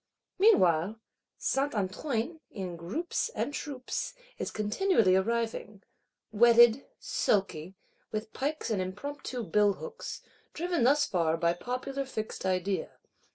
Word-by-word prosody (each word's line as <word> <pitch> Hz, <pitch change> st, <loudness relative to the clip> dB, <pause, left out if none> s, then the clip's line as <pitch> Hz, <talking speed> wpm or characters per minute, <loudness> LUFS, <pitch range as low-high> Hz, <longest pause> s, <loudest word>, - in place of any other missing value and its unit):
Meanwhile, 200 Hz, -, +4 dB, 0.4 s
Saint 275 Hz, -1 st, 0 dB
Antoine, 230 Hz, -, -2 dB
in 185 Hz, -3 st, -5 dB
groups 245 Hz, -, -2 dB
and 290 Hz, -, -2 dB
troops, 275 Hz, -, -4 dB, 0.2 s
is -, -, -2 dB
continually 215 Hz, -, +2 dB
arriving; 220 Hz, 0 st, -1 dB, 0.5 s
wetted, 235 Hz, +3 st, +6 dB
sulky; 190 Hz, -3 st, 0 dB, 0.4 s
with 215 Hz, +1 st, -4 dB
pikes 290 Hz, -1 st, -2 dB
and 200 Hz, -3 st, +1 dB
impromptu 245 Hz, +6 st, -5 dB
billhooks: 210 Hz, -, 0 dB, 0.3 s
driven 345 Hz, -5 st, 0 dB
thus 290 Hz, +3 st, +5 dB
far 165 Hz, -3 st, +1 dB
by 170 Hz, +1 st, +2 dB
popular 255 Hz, +7 st, -3 dB
fixed 215 Hz, -6 st, -4 dB
idea. 185 Hz, +1 st, -1 dB
220 Hz, 110 wpm, -30 LUFS, 190-275 Hz, 0.5 s, wetted